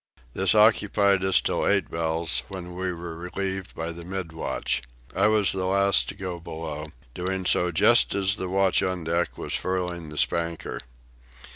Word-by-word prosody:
This 95 +2 +3
occupied 105 -3 +4
us 95 -1 +4
till - - 0
eight - - +1
bells, 80 -6 +1
when 90 -2 -8
we 90 0 -2
were 85 -1 -7
relieved 95 +2 -5
by 80 +1 -4
the 85 0 -9
mid 90 -2 -5
watch. 80 - -2 0.3
I 100 +3 +4
was 105 -3 +3
the 95 -1 -2
last 100 +1 +3
to - - -6
go 90 -3 -5
below, 80 -2 -6 0.3
doing 95 +3 -3
so 90 0 +2
just 105 +8 +5
as 100 +1 +1
the 95 - -4
watch 95 0 +2
on 95 -2 -2
deck 85 +2 -1
was - - -3
furling 90 -3 -2
the 75 - -8
spanker. 85 0 -1
90 Hz, 170 wpm, -25 LUFS, 85-95 Hz, 0.3 s, just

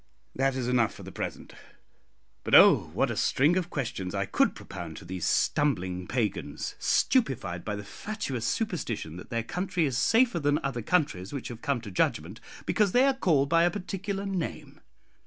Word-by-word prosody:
"That 135 0 +1
is 130 -2 -2
enough 120 -3 +2
for - - -11
the - - -9
present. - - -6 0.9
But - - +3
oh! - - +7
what - - +1
a - - -3
string 150 +6 +3
of 180 -2 -1
questions 115 - -4
I - - 0
could - - +1
propound 80 -2 -8
to - - -10
these 90 -2 -3
stumbling 95 -11 0
pagans, 115 -5 -2
stupefied 85 0 +1
by 105 - -3
the 105 - -6
fatuous 135 - -5
superstition 120 - -2
that 90 - -10
their 115 -2 -1
country 180 - -1
is 135 -3 -1
safer 225 - +3
than 145 -1 +2
other 130 -3 -2
countries 115 - 0
which 140 - -5
have 120 -1 -8
come 140 -4 -1
to 105 -3 -8
judgment, 90 +2 -1 0.3
because 210 -4 +2
they 250 +2 +5
are 275 - +4
called 160 - +2
by 165 0 +4
a 175 - +4
particular 195 +1 -4
name! 190 -4 -4
135 Hz, 180 wpm, -28 LUFS, -, 0.9 s, oh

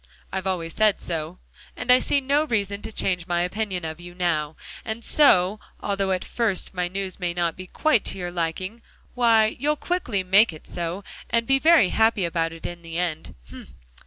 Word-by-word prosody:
I've 190 0 -2
always 170 -3 -2
said 215 -2 +3
so, 165 +1 -4 0.4
and 250 - +1
I 250 - +7
see 280 - +2
no 285 +3 +2
reason 205 -6 -1
to - - -6
change 180 -4 0
my 175 -1 +1
opinion 185 -1 -2
of 160 +1 -5
you 175 0 -11
now. 160 -4 -1 0.3
And 225 +1 -5
so, 210 -10 +4 0.2
although 195 -1 -1
at 185 -1 -1
first 220 -6 -1
my 180 -1 -1
news 190 +1 -4
may 175 -2 -2
not 170 -2 0
be 185 0 -9
quite 260 - +2
to - - -1
your 175 -1 -4
liking, 180 +6 -3 0.3
why, 225 -3 +3
you'll 300 +3 +1
quickly 285 - -1
make 195 +2 +5
it 155 - -13
so, 175 +3 -4 0.3
and 230 0 +1
be 270 +2 +3
very 315 - +5
happy 220 -4 +2
about 165 -1 -1
it 165 0 -10
in 175 0 -6
the 165 0 -6
end. 170 -3 -3
190 Hz, 190 wpm, -24 LUFS, 175-225 Hz, 0.4 s, I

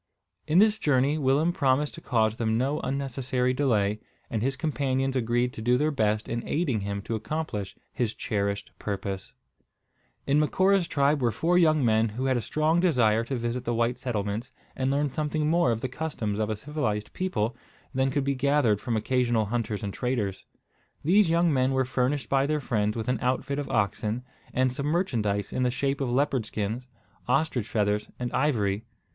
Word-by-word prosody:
In 155 +2 +2
this 215 +2 +5
journey 145 +1 +2
Willem 145 +5 +2
promised 140 0 +1
to - - -10
cause 110 -3 +1
them 110 -1 +1
no 135 +5 0
unnecessary 130 -1 -1
delay; 110 -6 +1 0.3
and 110 - -1
his 135 +3 0
companions 135 -2 0
agreed 120 0 +1
to - - -7
do 120 +2 +3
their 150 +3 +1
best 110 -5 0
in 115 0 -2
aiding 145 -8 0
him 100 0 -4
to 115 - -4
accomplish 110 -6 -3 0.2
his 120 -5 -1
cherished 100 -1 -2
purpose. 100 -2 -4 0.9
In 140 +2 +3
Macora's 185 +4 +3
tribe 140 0 +2
were 120 - +3
four 165 - +1
young 155 -6 +4
men 110 0 +3
who 125 +5 -4
had 130 -1 +2
a 120 - 0
strong 155 +7 +1
desire 120 -11 +3
to 135 - -3
visit 120 +1 -2
the 120 -1 -1
white 120 +2 0
settlements, 110 0 -3 0.2
and 130 0 0
learn 140 0 0
something 150 0 -1
more 165 -5 +3
of 115 -1 -2
the - - -1
customs 125 -7 -3
of 110 0 0
a 110 - -1
civilised 110 -4 -3
people 120 - -1 0.4
than 130 0 +2
could 140 +1 0
be 140 0 +1
gathered 130 -5 +2
from 120 -3 -1
occasional 120 -1 +1
hunters 110 -1 -2
and 100 -1 -3
traders. 105 -6 -2 0.6
These 185 +3 +4
young 170 -1 +3
men 130 0 +2
were 130 0 +2
furnished 130 0 0
by 135 +2 +2
their 155 0 +1
friends 105 -5 -1
with 110 - -3
an 125 - 0
outfit 130 +3 0
of 145 - -4
oxen, 105 +2 0 0.3
and 130 0 +1
some 140 +2 -3
merchandise 110 - 0
in - - -1
the 125 - +3
shape 135 +3 -1
of 135 - 0
leopard 130 -2 +1
skins, 110 +5 -3 0.4
ostrich 130 -8 +1
feathers, 105 -1 0
and 125 -1 -4
ivory. 110 -8 +1
125 Hz, 185 wpm, -27 LUFS, 110-145 Hz, 0.9 s, this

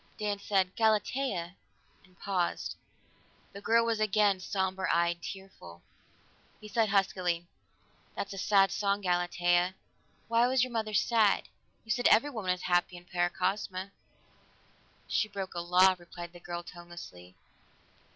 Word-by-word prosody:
Dan 205 -1 -2
said, 190 -2 0
"Galatea 215 -4 0 0.2
" - - -35
and 185 -1 -25
paused. 185 -3 -2 0.8
The 200 - -9
girl 230 +2 +3
was 230 -1 0
again 210 -2 +3
somber 190 0 -2
eyed, 170 0 +1
tearful. 170 - -10 0.8
He 215 - -10
said 220 +1 +1
huskily, 180 -3 +1 0.7
"That's 200 - -4
a 195 - -6
sad 195 -1 +4
song, 200 0 0
Galatea. 175 0 +1 0.5
Why 230 +1 +3
was 255 -1 +3
your 255 -1 -4
mother 215 -2 -2
sad? 220 -2 +3 0.4
You 220 - -4
said 245 +3 +3
everyone 230 -3 +3
was 180 0 0
happy 175 0 +1
in 175 - -14
Paracosma." 185 +2 -1 1.2
"She 215 - +1
broke 195 -2 -6
a 175 - -3
law," 180 +2 +5
replied 175 0 -10
the 175 - -12
girl 175 0 -6
tonelessly. 170 - -11
190 Hz, 135 wpm, -30 LUFS, 175-210 Hz, 1.2 s, law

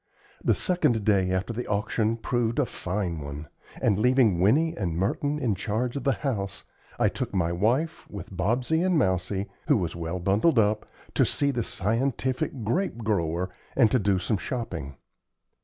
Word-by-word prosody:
The - - +3
second 120 - +1
day 95 -3 +3
after 95 +5 -1
the 120 +2 -4
auction 110 +2 0
proved 115 0 -1
a 145 - +3
fine 90 -6 -3
one; 70 +1 -7 0.3
and 100 -2 +2
leaving 120 -6 +4
Winnie 150 - +3
and 85 -5 -2
Merton 145 +10 0
in 125 -7 0
charge 110 +6 -2
of 140 - -4
the 135 - +4
house, 100 -7 -2 0.3
I - - +3
took - - -3
my 85 -2 +1
wife, 125 - 0
with 100 0 -8
Bobsey 125 - +1
and 185 -2 +2
Mousie, 95 -1 0 0.2
who 145 -5 +5
was 85 -5 -2
well 85 +1 -3
bundled 100 - +2
up, 105 0 +2 0.3
to - - +4
see 140 -1 +1
the 120 -3 -1
scientific 120 +4 -1
grape 175 - 0
grower, 90 -4 0 0.2
and 115 -6 +5
to 130 - +3
do 100 -2 +2
some 95 +3 0
shopping. 85 - -4
105 Hz, 170 wpm, -27 LUFS, 95-125 Hz, 0.3 s, who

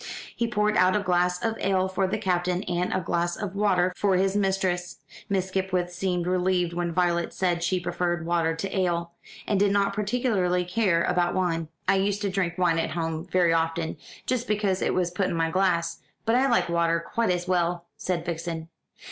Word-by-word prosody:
He 235 - 0
poured 210 -2 +1
out 185 +1 +4
a - - +3
glass 180 -2 +1
of 225 0 -1
ale 190 -1 +1
for 190 0 0
the 190 - -1
Captain 180 -2 0
and 180 -1 -1
a - - +1
glass 175 0 -1
of 205 -3 -4
water 185 -3 +2
for 200 -2 +2
his 190 +1 +1
mistress. 190 -3 0 0.3
Miss 190 -1 0
Skipwith 185 -2 -1
seemed 180 -1 -1
relieved 180 -1 +1
when 175 0 -1
Violet 170 0 0
said 175 -2 0
she 185 +2 +1
preferred 175 -1 -2
water 165 -1 +1
to 190 +4 -4
ale, 170 -2 0 0.3
and 205 - +1
did 200 0 +3
not 200 0 +2
particularly 205 -5 0
care 180 -3 +2
about 175 -1 +1
wine. 165 -3 0 0.2
"I 195 +1 +4
used 200 +2 0
to 200 - 0
drink 180 -2 -1
wine 175 -2 +2
at - - -1
home 165 -1 -3
very 180 -2 +3
often, 165 0 0 0.3
just 250 -1 -1
because 205 -3 0
it - - +1
was 180 -1 +1
put 185 +1 0
in - - -2
my 165 0 0
glass, 175 -3 +1 0.3
but 225 - +2
I 260 +3 +4
like 185 -8 +3
water 170 -1 +2
quite 230 +7 -1
as 180 0 0
well," 175 -1 0
said 175 -2 -2
Vixen. 165 -1 -4
180 Hz, 200 wpm, -26 LUFS, 170-195 Hz, 0.3 s, out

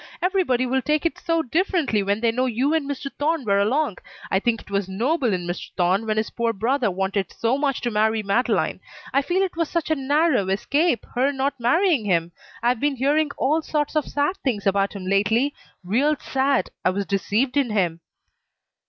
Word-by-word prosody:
Everybody 360 -10 +1
will 260 +1 0
take 300 +4 0
it 335 - -1
so 330 -1 0
differently 315 - +1
when 200 +2 -1
they 230 -1 +3
know 255 +3 0
you 255 +5 0
and 305 -3 0
Mr. 280 0 -4
Thorne 305 -1 0
were 200 -1 +2
along. 240 +1 0 0.3
I 190 - +3
think 230 +2 0
it - - -16
was 200 -1 -1
noble 245 - 0
in 180 -2 -2
Mr. 175 +1 -5
Thorne 185 +5 +1
when 215 0 0
his 215 - -1
poor 230 -1 -1
brother 240 +3 0
wanted 190 0 -2
so 230 +3 0
much 280 -2 -1
to 240 - -1
marry 220 +1 +1
Madeleine. 205 +5 0 0.3
I 275 - +4
feel 350 +7 0
it 375 - -3
was 330 -2 -1
such 335 -2 -2
a - - +4
narrow 280 - +1
escape 280 - +1
her 260 +3 +2
not 275 0 -1
marrying 285 - +2
him. 170 -3 +1 0.3
I've 240 0 +2
been 290 +1 +1
hearing 290 +4 +2
all 305 +5 +1
sorts 300 -1 -2
of 305 - +1
sad 290 +7 0
things 230 -7 -2
about 195 0 +1
him 195 -3 -7
lately. 215 +8 +2 0.3
Real 260 +12 +2
sad. 265 -5 0
I - - +3
was 200 +2 -2
deceived 210 +7 0
in 280 -4 +2
him." 180 -6 0
250 Hz, 200 wpm, -23 LUFS, 205-290 Hz, 0.3 s, I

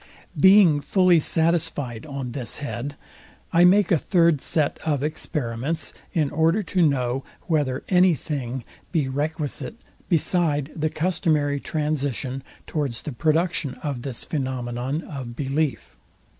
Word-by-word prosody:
Being 185 -1 +6
fully 185 0 +4
satisfyed 155 -7 0
on 135 -4 -5
this 120 -3 -4
head, 145 -1 -5 0.6
I 170 +1 +6
make 190 +1 +5
a 170 - +4
third 170 -5 +3
set 155 -3 +1
of 145 -4 -1
experiments, 150 -1 -2 0.2
in 150 -4 0
order 165 +7 +2
to 185 0 0
know, 135 -4 +1 0.2
whether 145 -5 0
any 180 -2 +5
thing 130 -4 -4 0.3
be 155 -6 +1
requisite, 150 +7 -3 0.3
beside 155 -4 +1
the 155 0 0
customary 150 -4 0
transition, 145 -4 -2 0.2
towards 140 -7 -2
the 150 - -4
production 155 +1 0
of 140 -5 -3
this 130 -2 -3
phænomenon 130 0 -3
of 130 -5 -7
belief. 140 -1 -2
150 Hz, 125 wpm, -24 LUFS, 135-165 Hz, 0.6 s, Being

